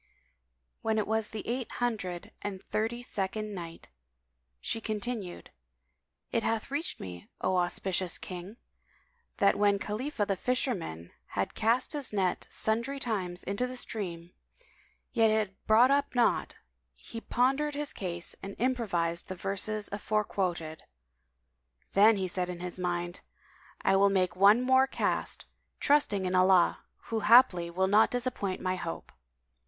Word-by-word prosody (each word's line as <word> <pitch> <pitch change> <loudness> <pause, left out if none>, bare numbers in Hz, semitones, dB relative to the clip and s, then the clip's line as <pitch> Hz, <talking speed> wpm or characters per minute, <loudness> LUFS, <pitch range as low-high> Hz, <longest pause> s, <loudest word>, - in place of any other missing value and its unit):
When 220 0 0
it 215 - +1
was 220 0 0
the 220 - -7
Eight 245 0 -3
Hundred 205 -8 -3
and 200 -2 -4
Thirty 225 +5 -2
second 210 -1 -3
Night, 170 - -8 0.7
She 225 - -2
continued, 215 -3 -4 0.8
It 230 - +1
hath 225 +3 -1
reached 295 +4 -2
me, 90 -1 -8
O 185 0 +1
auspicious 180 0 0
King, 185 +4 -8 0.8
that 200 0 +3
when 205 -1 +4
Khalifah 215 +3 -2
the 195 - 0
Fisherman 185 - -2 0.3
had 100 - 0
cast 230 +6 +1
his 290 -3 -1
net 190 -3 0
sundry 235 +6 +2
times 190 -9 -3
into 200 +6 -1
the 255 0 -7
stream, 175 -8 -5 0.8
yet 225 -1 +4
had 215 -1 +2
it 195 - -36
brought 235 +5 +6
up 280 -1 +1
naught, 245 - +2 0.4
he 230 - -9
pondered 275 +6 +1
his 295 0 -2
case 175 -3 -4
and 195 0 -7
improvised 190 -9 0
the 185 - -4
verses 200 +3 -2
afore 210 +1 0
quoted. 170 -6 -3 1.1
Then 210 +2 +6
he 190 -1 -1
said 180 0 -1
in 175 -1 -5
his 180 +1 -6
mind, 175 0 -2 0.6
"I - - +4
will 200 +1 +5
make 185 -2 +2
this 185 - -17
one 210 +5 +7
more 260 +1 +5
cast, - - -1 0.3
trusting 280 -10 +2
in 180 - -1
Allah 185 -1 +4 0.3
who 225 - +2
haply 210 -7 +6
will 185 +3 +1
not 210 +3 +5
disappoint 245 -6 -2
my 185 0 -1
hope." 165 -2 -6
205 Hz, 145 wpm, -30 LUFS, 180-235 Hz, 1.1 s, one